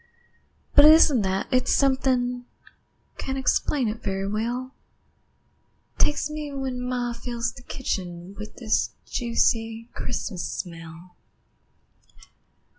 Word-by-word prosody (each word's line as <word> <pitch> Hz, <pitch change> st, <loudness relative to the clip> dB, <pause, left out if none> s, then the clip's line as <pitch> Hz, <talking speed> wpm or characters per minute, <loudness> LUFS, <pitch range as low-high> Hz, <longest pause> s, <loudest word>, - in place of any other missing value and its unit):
But 290 Hz, -, +8 dB
it 305 Hz, -, +11 dB
isn't 290 Hz, -7 st, +5 dB
that, 190 Hz, 0 st, 0 dB
it's 255 Hz, -1 st, +2 dB
something 255 Hz, -2 st, +2 dB, 0.7 s
Can't 265 Hz, 0 st, -3 dB
explain 265 Hz, 0 st, +1 dB
it 215 Hz, +1 st, -3 dB
very 195 Hz, -1 st, -2 dB
well 240 Hz, +5 st, -2 dB, 1.3 s
Takes 295 Hz, 0 st, +2 dB
me 300 Hz, -1 st, -5 dB
when 265 Hz, -2 st, -3 dB
ma 250 Hz, -1 st, -1 dB
fills 235 Hz, 0 st, -3 dB
the -, -, -12 dB
kitchen 180 Hz, -8 st, -4 dB
With 210 Hz, +1 st, -8 dB
this 220 Hz, -3 st, 0 dB
juicy 230 Hz, -1 st, 0 dB
Christmas 210 Hz, -6 st, -3 dB
smell. 165 Hz, 0 st, -8 dB
240 Hz, 110 wpm, -25 LUFS, 210-260 Hz, 1.3 s, it